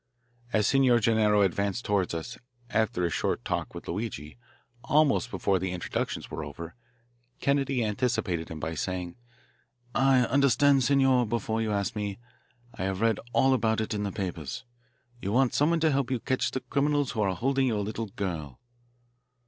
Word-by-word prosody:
As 105 -3 +2
Signor 130 -3 +4
Gennaro 105 -2 +3
advanced 100 +4 -1
toward 100 -5 0
us, 85 +8 -5 0.4
after 110 -5 +1
his 85 -2 0
short - - -1
talk - - -3
with - - -8
Luigi, 85 - -4 0.5
almost 145 -3 +3
before 100 -5 0
the 95 0 -2
introductions 90 - -3
were 80 - -4
over, 80 +3 -8 0.7
Kennedy 135 -3 +1
anticipated 105 -7 -1
him 80 - -6
by 80 +2 -3
saying: 90 +2 -3 0.8
"I 135 +1 +4
understand, 140 +1 +4
Signor, 130 -2 +3
before 115 0 -1
you 110 -1 -1
ask 100 0 -1
me. 100 -2 -3 0.6
I 95 - -4
have 95 +1 -2
read 115 -2 +2
all 135 +2 +4
about 110 -3 +1
it 110 +1 -2
in 105 - -2
the 100 -1 -2
papers. 90 - -5 0.6
You 100 - -2
want 130 0 +3
someone 165 +3 +2
to 160 -1 +4
help 135 -3 0
you 130 -2 0
catch 130 +2 0
the 130 - -4
criminals 145 0 0
who 110 - -2
are 95 -2 +1
holding 135 +5 +1
your 110 -4 0
little 110 +2 -3
girl." 85 -9 -5
110 Hz, 165 wpm, -28 LUFS, 95-130 Hz, 0.8 s, Signor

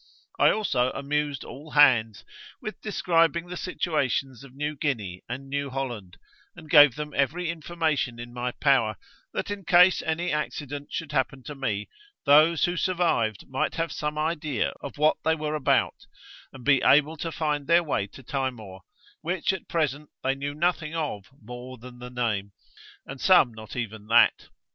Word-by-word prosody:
I - - +6
also 130 -13 +1
amused 145 0 -2
all 145 +4 -10
hands 120 -9 +4 0.3
with 215 - -7
describing 170 -5 +1
the 180 - -5
situations 140 -8 -2
of 135 - -13
New 150 +3 -4
Guinea 110 - -3
and 130 +3 -6
New 140 0 -2
Holland, 120 -9 -5 0.4
and 160 -3 -12
gave 145 -5 +8
them 150 0 -6
every 165 +5 0
information 160 -6 -2
in 120 0 -9
my 125 0 -3
power, 125 -8 +2 0.3
that - - -3
in 205 -1 -5
case 180 +1 +5
any 170 +2 -1
accident 145 -1 -4
should 160 -2 -4
happen 135 -2 -1
to 150 - -7
me, 110 -7 -3 0.4
those 155 +3 +5
who 175 0 -2
survived 165 - 0
might 135 0 -2
have 165 -1 -2
some 150 0 -3
idea 155 -5 -1
of 140 - -8
what 150 +1 +3
they 160 - +2
were 155 -1 -3
about, 150 -3 0 0.4
and 130 -3 -12
be 140 -2 +4
able 150 +2 +4
to 165 +1 -4
find 150 -3 -2
their 170 +1 +5
way 135 -10 -1
to 130 - -14
Timor, 120 -8 -4 0.4
which 175 +3 -1
at 190 - -7
present 150 -3 -1
they 135 - +2
knew 140 +1 -5
nothing 165 -1 -1
of 145 -11 -3
more 125 +3 -9
than 125 +1 -12
the 125 0 -8
name, 110 -5 -2 0.5
and 135 0 -9
some 165 -10 +5
not 110 -1 -10
even 110 -3 -5
that. 115 +2 +4
145 Hz, 165 wpm, -26 LUFS, 125-160 Hz, 0.5 s, gave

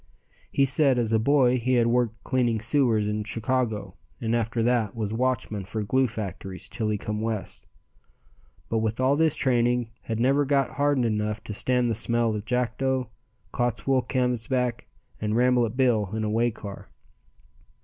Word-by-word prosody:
He 140 - +2
said 135 0 +3
as 115 -2 0
a 110 - +4
boy 130 0 +3
he 130 +2 0
had 120 -2 +4
worked 115 -3 0
cleaning 120 -4 +1
sewers 115 -3 +2
in 105 0 -1
Chicago 110 -3 -2 0.3
and 115 0 0
after 115 0 0
that 120 -3 +1
was 110 -2 -3
watchman 115 -4 -1
for 105 +3 -4
glue 130 +5 +2
factories 95 -4 -6
till 110 -3 -3
he 105 - 0
come 105 +1 -4
West, 110 -3 -4 1.0
but 115 - 0
with 110 +1 -2
all 130 +2 +3
this 160 0 +2
training 120 -2 +1
had 115 -1 -4
never 135 +4 +3
got 140 -1 +1
hardened 145 -3 +2
enough 105 -1 -1
to 105 - -6
stand 125 +3 +1
the 115 - +1
smell 115 +1 0
of 105 0 -5
Jackdo, 125 +1 -1 0.4
Cottswool 120 +2 +1
Canvasback 125 -1 -1 0.3
and 105 0 -1
Rambolet 125 -1 +2
Bill 115 -7 +2
in 110 - -2
a 105 - -1
way 115 +2 +2
car. 105 -3 -9
120 Hz, 165 wpm, -26 LUFS, 110-125 Hz, 1.0 s, a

